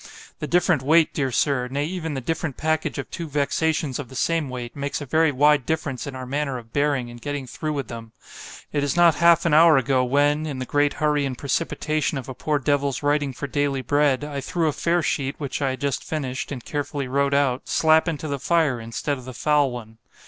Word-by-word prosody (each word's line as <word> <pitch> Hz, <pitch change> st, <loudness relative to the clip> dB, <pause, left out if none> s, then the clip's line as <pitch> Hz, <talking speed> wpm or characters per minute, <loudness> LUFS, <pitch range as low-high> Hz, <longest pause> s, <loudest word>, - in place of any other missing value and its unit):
The 150 Hz, -, -4 dB
different 175 Hz, -4 st, +2 dB
weight, 160 Hz, +4 st, +4 dB
dear 135 Hz, -3 st, 0 dB
Sir——nay 135 Hz, +2 st, 0 dB
even 160 Hz, -3 st, -4 dB
the 135 Hz, -, -3 dB
different 160 Hz, +1 st, -3 dB
package 160 Hz, -1 st, -1 dB
of 140 Hz, -, -4 dB
two 170 Hz, -, -5 dB
vexations 150 Hz, -1 st, 0 dB
of 140 Hz, -, -6 dB
the 130 Hz, -, -11 dB
same 160 Hz, +1 st, 0 dB
weight——makes 130 Hz, +3 st, -4 dB
a 145 Hz, -, -6 dB
very 160 Hz, +3 st, +3 dB
wide 145 Hz, +1 st, +4 dB
difference 145 Hz, -5 st, -2 dB
in 135 Hz, -, -6 dB
our 130 Hz, 0 st, -6 dB
manner 140 Hz, 0 st, -2 dB
of 115 Hz, -2 st, -12 dB
bearing 140 Hz, -4 st, 0 dB
and 120 Hz, 0 st, -12 dB
getting 145 Hz, 0 st, -4 dB
through 155 Hz, +5 st, -4 dB
with 140 Hz, -5 st, -3 dB
them.——It 115 Hz, +5 st, -8 dB
is 145 Hz, +3 st, 0 dB
not 170 Hz, -1 st, +6 dB
half 170 Hz, 0 st, +4 dB
an 165 Hz, -, +2 dB
hour 160 Hz, -1 st, +7 dB
ago, 130 Hz, 0 st, +2 dB
when 145 Hz, +4 st, +2 dB
(in 140 Hz, -3 st, -4 dB
the 130 Hz, -, -4 dB
great 145 Hz, +2 st, +1 dB
hurry 150 Hz, -1 st, +1 dB
and 130 Hz, -3 st, -3 dB
precipitation 155 Hz, +1 st, -1 dB
of 130 Hz, -, -6 dB
a 130 Hz, -, -5 dB
poor 150 Hz, +3 st, -1 dB
devil's 140 Hz, -1 st, 0 dB
writing 145 Hz, -1 st, +1 dB
for 130 Hz, -, -6 dB
daily 140 Hz, -1 st, -1 dB
bread) 145 Hz, -1 st, +2 dB
I 145 Hz, -2 st, -4 dB
threw 170 Hz, +2 st, -1 dB
a 150 Hz, -, +1 dB
fair 170 Hz, +2 st, +1 dB
sheet, 140 Hz, -2 st, -2 dB
which 140 Hz, -1 st, -4 dB
I 135 Hz, -, +1 dB
had 130 Hz, -, -5 dB
just 140 Hz, -2 st, -1 dB
finished, 135 Hz, -5 st, -4 dB
and 125 Hz, -4 st, -6 dB
carefully 145 Hz, -2 st, -3 dB
wrote 140 Hz, +2 st, +1 dB
out, 135 Hz, -2 st, 0 dB
slap 160 Hz, +1 st, +4 dB
into 160 Hz, -1 st, -3 dB
the 140 Hz, -1 st, -3 dB
fire, 155 Hz, -5 st, +1 dB
instead 115 Hz, +5 st, -3 dB
of 125 Hz, -, -12 dB
the 130 Hz, -1 st, -8 dB
foul 150 Hz, -2 st, +2 dB
one. 110 Hz, -2 st, -9 dB
145 Hz, 220 wpm, -23 LUFS, 130-155 Hz, -, hour